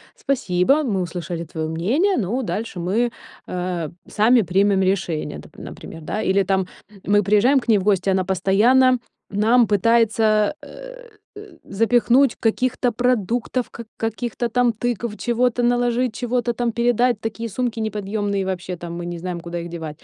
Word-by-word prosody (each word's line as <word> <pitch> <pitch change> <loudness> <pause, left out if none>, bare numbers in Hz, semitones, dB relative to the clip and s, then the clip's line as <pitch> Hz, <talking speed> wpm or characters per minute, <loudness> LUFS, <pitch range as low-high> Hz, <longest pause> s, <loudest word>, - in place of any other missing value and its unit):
спасибо, 190 -6 +1
мы 205 -8 -1
услышали 170 -1 -4
твоё 160 0 -4
мнение, 250 - +1
но 230 +4 -1
дальше 215 -3 -4
мы, 215 +8 0 0.4
э, 180 -3 -3 0.2
сами 230 +3 +4
примем 195 +2 +2
решение, 180 - -1
доп 75 0 -16
например, 165 - -9
да. 210 +7 -3
Или 195 +1 +2
там 190 0 0 0.4
мы 205 +1 +3
приезжаем 210 +8 +4
к - - -11
ней 220 - +6
в 190 - -2
гости, 195 -1 +2
она 190 0 +1
постоянно 215 +8 +3 0.3
нам 225 +4 +4
пытается, 215 +1 +3
э, - - -11 0.3
э, 410 - -9 0.2
запихнуть 235 +4 +3
каких-то 245 +2 0
продуктов, 245 +1 0
к 235 - -9
каких-то 230 +2 -2
там 245 +1 +2
тыкв, 235 -1 -3
чего-то 245 0 0
наложить, 245 0 +1
чего-то 245 -1 -1
там 240 0 -1
передать, 240 0 +1
такие 225 +1 -4
сумки 235 +1 -2
неподъёмные, 205 -1 -2
вообще 185 -1 -4
там 170 0 -7
мы 175 - -5
не 175 0 -5
знаем, 175 0 -4
куда 170 +1 -5
их 170 0 -6
девать. 160 -3 -7
215 Hz, 155 wpm, -21 LUFS, 185-245 Hz, 0.4 s, ней